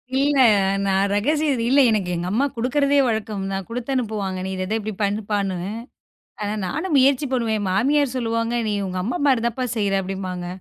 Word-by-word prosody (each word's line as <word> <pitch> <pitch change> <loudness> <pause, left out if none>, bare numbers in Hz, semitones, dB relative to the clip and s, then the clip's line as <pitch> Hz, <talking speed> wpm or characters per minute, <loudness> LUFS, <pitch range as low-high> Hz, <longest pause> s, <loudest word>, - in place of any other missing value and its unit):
இல்ல, 280 0 +3 0.4
நான் 195 +1 +2
ரகசியம் 295 +8 +1
அது 230 - -2
இல்ல. 275 +2 +5
எனக்கு 200 -5 0
எங்க 175 +1 -3
அம்மா 245 +7 +2
குடுக்குறதே 280 +4 +2
வழக்கம் 215 -3 -2
தான். 195 -1 -3
குடுத்து 240 +2 -5
அனுப்புவாங்க, 210 -6 -2
நீ 190 - -3
இத, 185 - -4
இத 215 - -1
இப்பிடி 215 0 -5
பண்ணப்பான்னு. 200 -2 -1 0.9
ஆனா, 205 0 -2
நானும் 315 - -2
முயற்சி 275 +1 +4
பண்ணுவேன், 230 -4 0
என் 205 - -2
மாமியார் 275 +7 +2
சொல்லுவாங்க, 230 -1 -1
நீ - - 0
உங்க 185 0 -4
அம்மா 230 - -2
மாரிதாம்ப்பா 245 -1 +1
செய்யுற 200 -2 0
அப்பிடிம்பாங்க. 185 -2 -5
220 Hz, 175 wpm, -22 LUFS, 195-260 Hz, 0.9 s, இல்ல